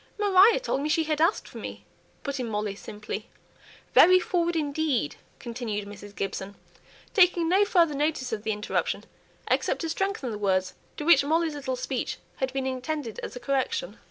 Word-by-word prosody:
"Maria 410 +2 +6
told 380 - -1
me 300 - -1
she 320 +1 +3
had 305 -1 -1
asked 335 +6 +2
for - - -9
me," - - -8 0.4
put 280 -1 -3
in 245 -2 -2
Molly, 210 -1 -2
simply. 210 +1 -7 0.6
"Very 370 +1 +8
forward 345 -1 0
indeed!" 290 - 0 0.2
continued 225 -4 -4
Mrs. 205 0 -11
Gibson, 195 0 -4 0.6
taking 355 -4 +4
no 385 +4 +4
further 340 -6 +3
notice 285 -4 -1
of 215 - -2
the 220 +1 -1
interruption, 210 0 -1 0.4
except - - +1
to 330 - -2
strengthen 390 - -2
the 210 - -5
words 185 -2 +1 0.2
to - - -4
which 310 -4 +7
Molly's 320 +2 +1
little 265 -3 -3
speech 255 0 -3 0.2
had 265 -1 -1
been 265 0 -2
intended 260 -1 -3
as - - -6
a - - -5
correction. 275 - -1
280 Hz, 175 wpm, -27 LUFS, 220-335 Hz, 0.6 s, Very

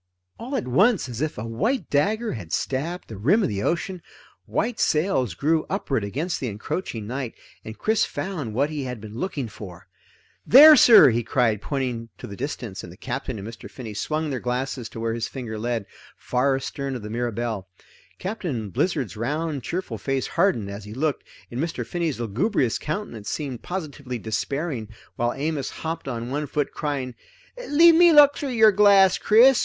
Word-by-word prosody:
All 255 +4 -5
at 240 - -2
once, 195 - +3
as 120 0 -6
if 155 0 -2
a 110 - -4
white 175 - -1
dagger 215 +11 +1
had 90 -8 -8
stabbed 160 - -2
the 110 - -8
rim 175 - +3
of - - +1
the 100 -2 -3
ocean, 175 - -2 0.5
white 240 -2 -1
sails 150 - +1
grew 155 - +1
upward 140 - -1
against 150 - -3
the 130 - -3
encroaching 110 - -4
night, 125 +1 -4 0.3
and 110 0 -8
Chris 220 0 +2
found 155 - -4
what 140 +5 +1
he 145 -3 -3
had 125 -2 -5
been 105 0 -10
looking 140 0 -3
for. 95 -5 -11 0.6
"There 300 +5 +10
sir!" 230 - +8
he 115 +1 0
cried, 115 -3 +1
pointing 125 -5 -3
to - - -9
the 100 - -8
distance, 120 -5 -5
and - - -9
the - - -14
Captain - - -4
and 100 +1 -7
Mr. 115 -1 -9
Finney 115 -5 -8
swung 155 +8 -2
their 130 - -2
glasses 125 -1 -3
to - - -9
where 115 0 -1
his 115 0 -2
finger 115 -5 -6
led, 115 -2 -2 0.3
far 135 +2 +1
astern 135 0 -4
of 120 - -6
the 105 - -6
Mirabelle. 115 -4 -3 0.5
Captain 165 - -4
Blizzard's 135 - -1
round 145 +5 -2
cheerful 165 - -4
face 135 +4 -1
hardened 165 - +1
as 100 +1 -8
he 105 +1 -9
looked, 150 +2 -1 0.3
and 120 - -4
Mr. 165 +1 -3
Finney's 165 -7 -2
lugubrious 120 - 0
countenance 150 - -5
seemed 135 -6 -4
positively 145 -8 -5
despairing, 120 +3 -3 0.3
while 120 0 0
Amos 145 -1 -2
hopped 165 -2 -5
on 120 -1 -4
one 145 +1 -2
foot 145 0 -1
crying: 140 -4 -3 0.6
"Leave 330 +3 +7
me 345 +1 +7
look 290 -2 +7
through 285 - -4
your 220 -3 +6
glass, 200 -2 +5
Chris! 240 +4 +6
135 Hz, 180 wpm, -24 LUFS, 115-175 Hz, 0.6 s, There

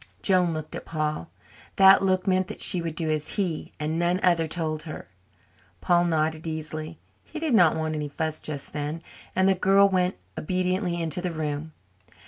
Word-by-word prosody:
Joan 180 -3 +3
looked 155 -1 -5
at - - -6
Paul. 155 - -3 0.5
That 195 0 +7
look 185 -1 +1
meant 185 -1 +2
that 215 - -8
she 180 -3 +3
would 165 -2 -4
do 160 -2 -1
as 155 -1 -2
he, 180 -7 -2
and 155 +2 -2
none 175 +1 +1
other, 170 -3 +3
told 155 -1 -2
her. 155 -1 -8 0.7
Paul 175 -1 +3
nodded 160 -1 0
easily 155 0 -5 0.3
he 320 - -10
did 310 -4 -1
not 175 -7 +5
want 160 0 -2
any 150 -1 -3
fuss 155 +1 -3
just 145 -3 -6
then 150 +2 -4 0.3
and 190 +1 +3
the 195 - +5
girl 195 +2 +4
went 180 -1 +1 0.2
obediently 185 +1 -1
into 165 +1 -1
the 180 - -2
room. 155 -1 -4
165 Hz, 180 wpm, -26 LUFS, 155-185 Hz, 0.7 s, That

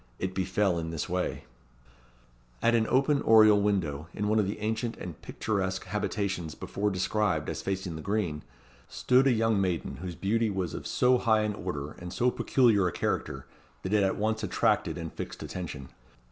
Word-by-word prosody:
It 95 0 -3
befel 95 -1 +1
in 80 0 -4
this 80 -2 -3
way: 90 0 -2 1.2
At 115 - +3
an 115 -1 +3
open 140 +2 +2
oriel 110 -2 +6
window, 85 -7 0
in 105 - -1
one 110 +1 +3
of 100 - +1
the 100 - -3
ancient 110 +2 -2
and 85 -4 -8
picturesque 95 -3 -2
habitations 100 -4 -2
before 105 +1 -2
described 105 +2 0
as - - -4
facing 95 -3 -3
the - - -7
green, 100 -7 -1 0.5
stood 130 +2 +3
a - - +5
young 115 -3 +2
maiden, 90 -3 -2
whose 90 0 -6
beauty 110 +5 +1
was 95 -5 -2
of - - -5
so 125 0 +3
high 110 -1 +3
an 105 0 -1
order, 75 -7 -5
and 90 0 -7
so 125 +6 +2
peculiar 115 -10 +3
a - - -1
character, 65 -3 -2 0.4
that 95 - -2
it 105 - +4
at 95 -1 +1
once 110 +1 0
attracted - - +1
and - - -6
fixed - - -6
attention. 75 -7 -6
100 Hz, 180 wpm, -29 LUFS, 90-110 Hz, 1.2 s, oriel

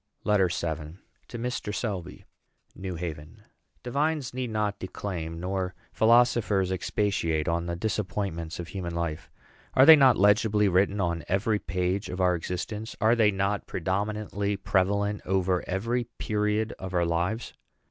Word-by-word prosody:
LETTER 105 -3 +3
VII. 80 -1 -4 0.3
TO 120 - -7
MR. 115 -2 -3
SELBY. 95 -6 -4 0.5
NEW 95 -1 -5
HAVEN. 80 +4 -7 0.4
Divines 145 +1 -1
need 125 -1 -3
not 105 -2 -1
declaim, 85 -4 -5
nor 90 0 -2 0.2
philosophers 110 -4 +3
expatiate, 90 -5 0
on 85 0 0
the 85 - -2
disappointments 90 -4 -3
of 85 - -6
human 85 -3 -5
life. 85 -2 -3 0.5
Are 130 - +7
they 160 - +11
not 135 -5 +5
legibly 105 +1 +4
written 95 +2 +2
on 85 -3 -1
every 105 +3 +1
page 90 +3 -2
of 90 - -5
our 90 -1 +3
existence? 95 +6 -4
Are 110 +1 +4
they 110 -3 +4
not 100 +1 -1
predominantly 100 +2 -2
prevalent 100 +2 0
over 95 -1 +1
every 115 +6 -1
period 105 +1 0
of 95 -1 -5
our 85 -1 +3
lives? 85 +7 -1
95 Hz, 140 wpm, -27 LUFS, 90-105 Hz, 0.5 s, they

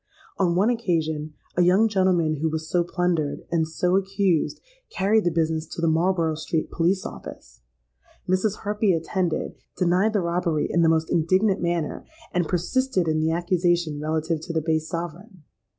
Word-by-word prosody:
On 175 -3 +2
one 205 +6 +3
occasion, 160 -9 -1 0.2
a 180 - +3
young 185 +5 +5
gentleman 185 -6 +2
who 160 +3 0
was 160 0 -4
so 175 +1 +1
plundered, 175 -4 -1
and 160 -2 +1
so 180 +3 0
accused, 195 -3 +1 0.3
carried 205 +2 +1
the - - +4
business 160 -1 -1
to - - -8
the 165 - +1
Marlborough 165 0 +2
Street 155 +1 -3
Police 180 +3 +1
Office. - - -10 0.7
Mrs. 190 +3 0
Harpy 210 -1 +1
attended, 165 +1 -1 0.2
denied 185 +4 +2
the 205 - +2
robbery 170 -2 0
in 170 - +1
the 165 - +4
most 160 0 +1
indignant 185 +5 +2
manner, 170 -3 -2 0.3
and 175 -2 +1
persisted 185 +2 0
in 155 0 +1
the 160 +1 +1
accusation 175 -2 0
relative 160 +1 -1
to 165 - -6
the 165 - 0
base 160 0 -1
sovereign. 175 +2 -6
170 Hz, 165 wpm, -24 LUFS, 160-185 Hz, 0.7 s, young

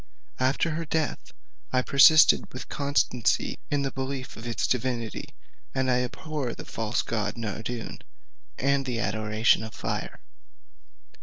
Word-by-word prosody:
After 135 +5 +1
her 165 +2 -2
death 160 -1 -2 0.4
I 130 -1 +2
persisted 150 +4 +6
with - - -8
constancy 140 -4 +1
in 145 -1 +1
the 135 - -1
belief 130 0 -5
of 115 +2 -8
its 115 - -1
divinity: 120 -2 -2 0.5
and 130 -1 +1
I 125 0 +3
abhor 135 +1 -4
the - - -9
false 115 -2 -1
god 105 -2 -2
Nardoun, 115 +1 -5 0.6
and 135 0 +1
the 120 -2 -1
adoration 110 0 +2
of 110 - -8
fire. - - -4
130 Hz, 135 wpm, -27 LUFS, 115-140 Hz, 0.6 s, persisted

